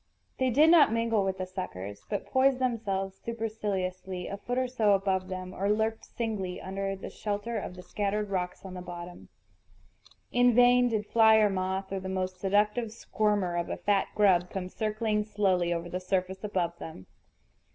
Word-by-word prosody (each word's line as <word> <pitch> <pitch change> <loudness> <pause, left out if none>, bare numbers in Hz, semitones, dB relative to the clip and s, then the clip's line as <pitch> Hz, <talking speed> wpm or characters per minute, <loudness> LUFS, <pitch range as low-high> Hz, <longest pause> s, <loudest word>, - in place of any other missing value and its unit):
They 260 -1 +2
did 300 +7 +5
not 325 -9 +7
mingle 230 -2 +1
with 190 0 -1
the 185 - -3
suckers, 100 - -7
but 205 - -2
poised 265 0 +3
themselves 200 -6 -2
superciliously 195 -5 -3
a - - -4
foot 245 +4 -4
or 255 0 +1
so 225 -5 +2
above 190 -1 0
them, 185 0 -6
or 195 +2 -1
lurked 220 +1 0
singly 200 -6 -3
under 195 +1 -3
the 190 - -8
shelter 210 +2 -3
of 180 - -7
the 180 - -10
scattered 205 +2 -2
rocks 180 0 -3
on 190 - -7
the 180 - -6
bottom. 175 0 -9 1.0
In 245 -1 +4
vain 245 0 +6
did 215 -2 -1
fly 220 0 +5
or 215 -2 +4
moth, 190 +1 -2
or 195 - -2
the 190 0 -6
most 185 -1 -3
seductive 210 +4 +1
squirmer 210 -5 0
of 170 0 -2
a - - -3
fat 205 -1 +1
grub, 185 -4 +4
come 185 -2 -4
circling 215 0 -1
slowly 190 -5 +1
over 170 0 -2
the 180 +1 -3
surface 185 +1 -2
above 175 -5 -2
them. 125 -13 -9
195 Hz, 180 wpm, -29 LUFS, 185-220 Hz, 1.0 s, not